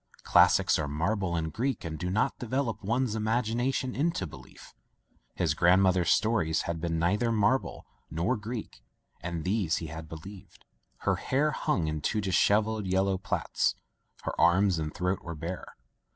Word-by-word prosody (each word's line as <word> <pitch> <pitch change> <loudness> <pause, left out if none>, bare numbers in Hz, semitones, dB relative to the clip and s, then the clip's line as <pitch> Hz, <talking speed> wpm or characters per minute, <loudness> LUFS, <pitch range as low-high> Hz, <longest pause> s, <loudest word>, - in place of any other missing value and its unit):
Classics - - +4
are 75 - -1
marble 85 +5 -1
and 80 -2 -2
Greek 130 -3 -2
and 80 -2 -5
do 90 - -2
not 110 +8 0
develop 120 -3 -2
one's 120 +3 0
imagination 120 +4 0
into 150 - 0
belief. 75 - -13 0.6
His 80 -4 +1
grandmother's 90 +1 +4
stories 100 -8 +2
had 85 -1 -3
been 85 -1 -1
neither 100 +8 +1
marble 115 +4 +1 0.2
nor 90 +10 0
Greek, 110 - -6 0.4
and 85 -1 -4
these 95 -3 0
he 80 - -5
had 80 -1 -8
be 80 - -6
lieved. 95 +3 -12 0.4
Her - - +1
hair 145 +3 +1
hung 85 - 0
in 75 -1 -2
two 110 +9 0
dishevelled 105 +2 +2
yellow 95 +1 +1
plaits. - - 0 0.5
Her - - -3
arms 90 0 +4
and 75 -1 -3
throat 90 +3 -1
were 85 -1 -6
bare. 85 +4 -6
95 Hz, 155 wpm, -29 LUFS, 85-110 Hz, 0.6 s, Classics